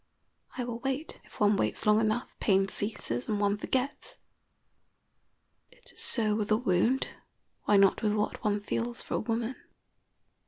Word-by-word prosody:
I 250 - -1
will 240 -1 -4
wait. 270 +4 -3
If - - -15
one 205 -1 +4
waits - - -1
long 210 0 +5
enough, 220 +3 -1
pain 195 -1 +3
ceases 190 - -4
and 210 - 0
one 205 0 +2
forgets. 275 - -2 1.5
It - - -16
is - - -10
so 215 -3 +2
with 210 -1 -1
a 215 - +4
wound, 235 +3 +2 0.6
why 205 - +5
not 195 -1 +5
with 210 -1 +2
what 210 0 -1
one 205 -1 +1
feels 235 +3 -3
for - - -6
a - - +1
woman? 230 +3 -2
215 Hz, 160 wpm, -30 LUFS, 205-240 Hz, 1.5 s, long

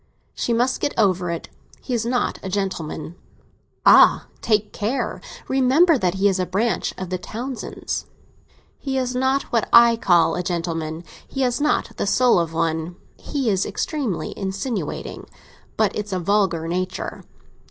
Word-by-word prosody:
"She - - -2
must 245 +3 +1
get - - -1
over 185 -5 +2
it. 170 -1 -4 0.3
He 255 - -5
is 235 -1 0
not 245 0 0
a 190 - -5
gentleman." 185 -5 -3 0.7
"Ah, - - +7 0.2
take 210 -2 +1
care! 230 +6 -2 0.3
Remember 270 +6 +4
that 185 -8 0
he 195 +1 +3
is 190 -1 +1
a 185 - 0
branch 210 +6 0
of 185 -1 -6
the 185 - -1
Townsends." 240 +6 -5 0.7
"He 270 -2 -2
is 255 -1 -1
not 265 +2 +1
what 230 -3 +1
I 235 0 +8
call 175 -7 +3
a 180 - -1
gentleman. 165 -2 -3 0.2
He 270 - -4
has 250 +1 +1
not 290 -6 0
the - - -1
soul 245 -2 +4
of 165 -1 -1
one. 160 +1 -1 0.2
He 275 -4 -3
is 190 -1 +1
extremely 230 - -3
insinuating; 195 +4 -4 0.5
but 215 -2 +2
it's 210 -1 -4
a 185 - 0
vulgar 180 -3 +1
nature. 185 +2 -3
205 Hz, 155 wpm, -22 LUFS, 180-245 Hz, 0.7 s, I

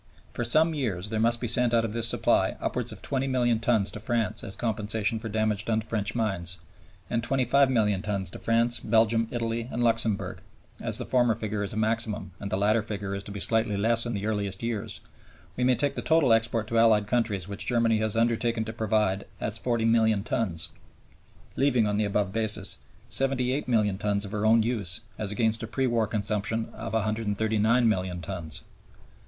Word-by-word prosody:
For 120 - -2
some 155 +8 +3
years 105 - -3
there 110 0 -2
must 115 +1 +2
be 120 - -3
sent 120 +1 +3
out 115 -1 +3
of 110 - -4
this 115 0 +2
supply - - +2
upwards - - -1
of - - -10
20,000,000 130 -4 0
tons 110 -4 +3
to - - -7
France 115 +1 -1
as 95 - -3
compensation 110 0 -1
for 115 0 -6
damage 110 -1 0
done 110 -1 +1
to - - -11
French 110 0 -1
mines, 95 -6 +1 0.5
and 115 - -1
25,000,000 125 -5 +2
tons 100 -4 -2
to - - -8
France, 115 +1 +2
Belgium, 115 +1 +2
Italy, 115 0 -3
and 120 - -1
Luxemburg; 115 -3 0 0.4
as - - +4
the - - -1
former 120 -3 +2
figure 105 -1 -3
is 100 - -3
a 110 - -5
maximum, 110 -3 -1
and 100 - -5
the 95 - 0
latter 105 +3 +2
figure 100 -2 -5
is 100 - -3
to 100 - -9
be 100 - -6
slightly 110 -1 +2
less 115 +3 +1
in 120 - -3
the 100 +1 -3
earliest 100 -2 -2
years, 115 -3 -4 0.5
we 125 - -1
may 125 0 +4
take 140 +2 0
the - - -4
total 160 -7 +3
export 115 0 +1
to 115 - +2
Allied 110 -2 +4
countries 105 -5 -1
which 100 0 -5
Germany 115 -2 +2
has 110 0 -1
undertaken 115 0 +1
to 110 - -6
provide 105 -3 0
as 110 +1 -1
40,000,000 115 -3 +2
tons, 90 -7 -1 0.9
leaving, 125 -5 +2
on 105 0 0
the 105 - +1
above 100 -1 -1
basis, 110 -3 -1 0.3
78,000,000 125 -6 +1
tons 100 -1 0
for 105 +1 -4
her 110 - +1
own 115 0 +5
use 110 -6 -2 0.2
as 105 -2 -3
against 110 +1 0
a 115 - -4
pre 130 +4 -1
war 115 -3 +1
consumption 105 +1 -2
of 115 0 -7
139,000,000 110 -2 +1
tons. 85 -3 -5
110 Hz, 190 wpm, -27 LUFS, 105-115 Hz, 0.9 s, own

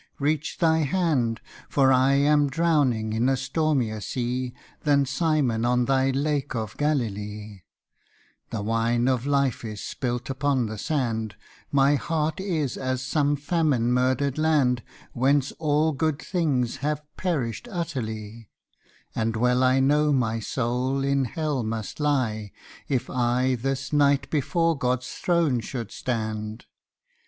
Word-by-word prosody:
reach 150 +2 -1
Thy 160 -2 +3
hand, 145 -7 +1 0.3
For 135 -2 +4
I 130 +1 +4
am 145 +1 +3
drowning 135 -8 +1
in 115 +4 +2
a 135 - +2
stormier 130 -6 0
sea 125 +2 -2 0.3
Than 140 -2 +3
Simon 135 -6 +1
on 125 0 +2
Thy 135 0 +2
lake 140 0 -1
of 110 -2 -4
Galilee: 105 -8 -2 0.9
The 110 -3 -3
wine 115 +2 +1
of 130 0 0
life 140 -4 +1
is 110 -2 -6
spilt 125 -1 -3
upon 135 -2 0
the 110 -1 -5
sand, 115 -8 -1 0.4
My 140 +1 +4
heart 155 +2 -1
is 160 -9 -1
as 130 -1 -2
some 145 +2 +1
famine 145 -5 +1
murdered 130 +3 +1
land 145 -6 +2 0.3
Whence 135 +2 +2
all 155 0 +2
good 155 0 -1
things 145 -9 0
have 150 +2 -2
perished 160 - -2
utterly, 115 - -5 0.6
And 115 0 -1
well 125 +2 +2
I 130 +1 +4
know 150 +3 +3
my 115 -5 +1
soul 125 +4 -1
in 140 -1 +1
Hell 150 +1 -2
must 110 +2 -4
lie 120 -9 0 0.4
If 130 -3 0
I 125 +1 +1
this 130 +3 -3
night 145 -1 +3
before 165 +3 +1
God's 125 -2 -1
throne 170 -8 +1
should 115 -2 -5
stand. 110 -2 -4
130 Hz, 135 wpm, -25 LUFS, 120-145 Hz, 0.9 s, For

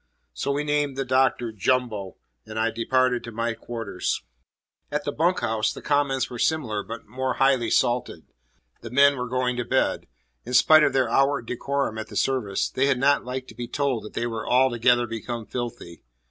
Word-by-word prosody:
So 140 - -2
we 145 +1 -1
named 145 -2 0
the 135 - -1
Doctor 130 -2 +2
"Jumbo," 110 -2 -1 0.3
and 110 - -7
I 115 +1 +1
departed 125 +2 +1
to 115 - -7
my 115 +1 -2
quarters. 115 -4 -4 0.7
At - - -1
the - - -2
bunk - - +1
house, 110 -1 0
the - - -8
comments 140 -3 +1
were 120 - -8
similar 120 -11 0
but 115 +2 -8
more 130 +3 -3
highly 135 -4 +2
salted. 120 -9 0 0.6
The 115 - -8
men 140 +3 +5
were 125 -1 -4
going 125 0 0
to 120 - -1
bed. - - 0 0.4
In 125 +2 -3
spite 155 +5 +7
of - - +2
their 130 -2 +2
outward 135 +1 +2
decorum 135 -1 -2
at 110 - -5
the - - -11
service, 120 -8 0
they 135 +2 0
had 140 -2 +2
not 140 +1 +2
liked 130 +1 -5
to - - -12
be 120 - -5
told 135 -2 -1
that 105 - -10
they 120 - -2
were 115 -2 -4
"altogether 120 -1 +4
become 115 0 -5
filthy." 120 -7 -6
125 Hz, 190 wpm, -25 LUFS, 115-135 Hz, 0.7 s, spite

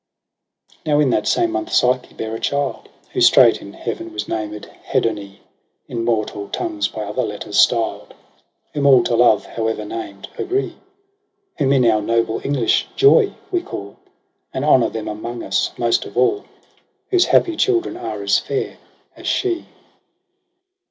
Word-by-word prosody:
%% - - -40
Now 150 -1 +3
in 145 -4 +3
that - - 0
same 345 -1 +2
month 345 0 -3
Psyche 125 0 +1
bare 110 0 -5
a 115 - -4
child, 140 -1 -2 0.2
Who - - -1
straight - - +6
in - - -10
heaven - - -5
was 105 0 -4
named 105 -1 -4 0.2
Hedone 100 -3 -1 0.5
In 115 -1 -3
mortal 110 -3 -1
tongues 330 -3 -2
by - - -6
other - - -2
letters - - -2
styled; - - +1 0.6
Whom 145 -1 +1
all 130 -3 +7
to 120 - 0
love, 120 +1 +4
however 110 -1 -3
named, 105 -2 -7
agree: 380 +2 -1
• - - -20 0.9
Whom 135 -2 +2
in 130 -3 +4
our 110 -2 +3
noble 115 +1 0
English 135 -5 +1
JOY 415 +1 +5 0.2
we 355 -2 +1
call. 100 - -8 0.5
And 130 - -3
honour 130 -5 +4
them 110 -1 -5
among 115 +3 -5
us - - 0
most 120 -1 +1
of - - -10
aU, 125 - +2 0.7
Whose 365 -2 +4
happy 340 -2 +3
children 365 0 +1
are 110 -3 -5
as 100 -1 +3
fair 140 - -4 0.4
as - - -9
she. 355 -3 -1
120 Hz, 160 wpm, -20 LUFS, 110-150 Hz, 0.9 s, all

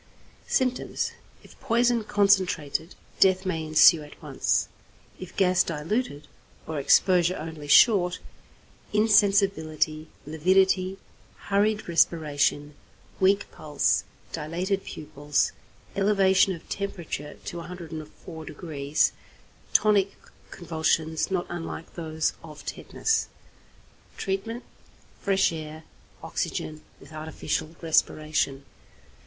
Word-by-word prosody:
Symptoms. 255 -2 0 0.3
If - - -18
poison 240 -2 +2
concentrated, 190 -7 +1 0.2
death 190 0 +4
may 165 -4 -1
ensue 155 +1 +6
at 150 0 -13
once; - - 0 0.5
if 185 - -9
gas 185 -2 +3
diluted, 160 - -2 0.4
or 160 -2 -3
exposure 180 +5 +4
only 155 -2 -7
short, 180 +2 +5 0.8
insensibility, 195 -8 +2 0.2
lividity, 185 +4 +2 0.5
hurried 210 +2 +2
respiration, 150 -3 +1 0.5
weak 195 +1 +2
pulse, 150 -2 0 0.3
dilated 175 +5 -2
pupils, 145 -1 -1 0.4
elevation 195 -2 +3
of 165 - -15
temperature 175 -7 -5
to 175 - -5
104°, 160 -3 -3 0.6
tonic 200 -2 +3 0.4
convulsions 160 -1 -1
not 185 -2 -1
unlike 165 -1 -6
those 160 -2 -2
of 155 -2 -11
tetanus. 445 0 -1 0.9
Treatment. 225 +5 -3 0.6
Fresh 195 -3 +2
air, 155 0 -7 0.4
oxygen, 155 0 -3 0.2
with - - -15
artificial 155 +1 -4
respiration. 155 -3 +1
170 Hz, 90 wpm, -26 LUFS, 155-195 Hz, 0.9 s, ensue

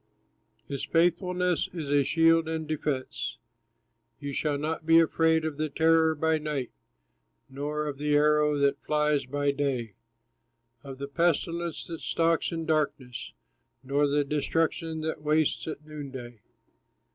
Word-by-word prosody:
His 140 -2 -4
faithfulness 180 0 +1
is 160 -5 -5
a 145 0 +4
shield 165 +2 +3
and 160 -1 -3
defense, 145 -3 -3 0.8
You 140 -1 -5
shall 145 0 0
not 155 +2 -3
be 165 +1 +6
afraid 160 0 +3
of 155 -3 -3
the 155 0 -1
terror 160 +1 +3
by 160 +1 +1
night, 150 -5 -3 0.8
Nor 150 +2 -3
of 145 -2 -5
the 150 0 +1
arrow 150 0 +3
that 140 -1 +1
flies 150 -2 +1
by 145 +1 0
day, 135 -6 -2 0.9
Of 135 -2 -8
the 140 +1 -5
pestilence 170 +2 0
that 165 -2 -7
stalks 165 -1 +1
in 165 -1 -3
darkness, 145 -6 -2 0.5
Nor 140 +2 +2
the 145 +1 +2
destruction 160 +2 -1
that 160 -1 -3
wastes 155 +1 +1
at 150 -1 -6
noonday. 135 -6 -8
150 Hz, 135 wpm, -28 LUFS, 140-160 Hz, 0.9 s, be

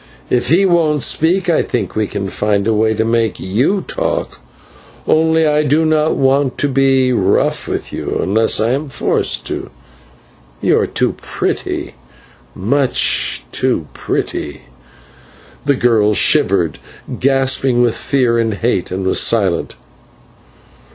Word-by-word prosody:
If 125 - +1
he 180 +6 +4
won't 160 -5 +2
speak 175 +4 +1
I 170 - +2
think 110 -7 -3
we 110 -1 0
can 100 -1 -4
find 100 0 -1
a 115 - +2
way 110 +1 +1
to 110 - 0
make 115 -2 0
you 130 - 0
talk, - - -3 0.7
only 160 0 +3
I 150 0 +2
do 150 +2 +1
not 155 0 +1
want 135 0 +1
to 145 - +1
be 135 -1 +2
rough 100 -4 0
with - - -5
you - - -3
unless 110 +3 +2
I 110 +2 +1
am 140 +4 -2
forced 135 - -2
to - - -3
it. - - -19 0.9
You - - +2
are - - 0
too - - 0
pretty, - - -3 0.6
much 130 +7 +1
too - - -1
pretty." 70 -1 -4 1.0
The 140 - +2
girl 110 -4 +2
shivered, - - +2 0.4
gasping 135 -2 +2
with 120 -2 +2
fear 125 -4 0
and 115 -2 0
hate, 105 -4 -1
and 95 +1 -4
was 95 - +2
silent. - - +1
125 Hz, 140 wpm, -16 LUFS, 110-150 Hz, 1.0 s, he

